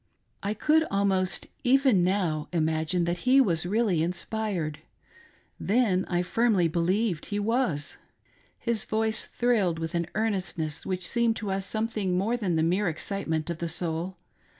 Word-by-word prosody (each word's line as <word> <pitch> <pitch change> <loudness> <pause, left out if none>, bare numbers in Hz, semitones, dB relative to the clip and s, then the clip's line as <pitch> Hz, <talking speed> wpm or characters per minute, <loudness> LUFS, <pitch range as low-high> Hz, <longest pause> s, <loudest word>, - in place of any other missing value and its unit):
I 205 +2 -2
could 310 +8 +3
almost, 190 -2 0 0.2
even 260 -7 +4
now, 175 -5 0
imagine 160 +1 0
that 175 +1 -1
he 255 +7 +4
was 175 -9 +2
"really 205 -4 +1
inspired. 175 -3 -2 0.8
Then 205 -4 +2
I 175 0 0
firmly 205 -2 +2
believed 175 +2 0
he 205 - -2
was. 205 - 0 0.6
His 230 -2 -1
voice 220 0 0
thrilled 215 -9 +1
with 165 +1 -4
an 170 -1 -1
earnestness 185 -8 -2
which 185 -1 -2
seemed 235 -1 +1
to 210 -3 -4
us 195 0 -2
something 215 -4 -1
more 215 +6 +1
than 200 -8 -1
the 160 - +2
mere 185 +5 +1
excite 195 +5 -3
ment 160 +1 -1
of 165 - -5
the 170 - -2
soul. 170 +2 -3
190 Hz, 150 wpm, -27 LUFS, 170-220 Hz, 0.8 s, even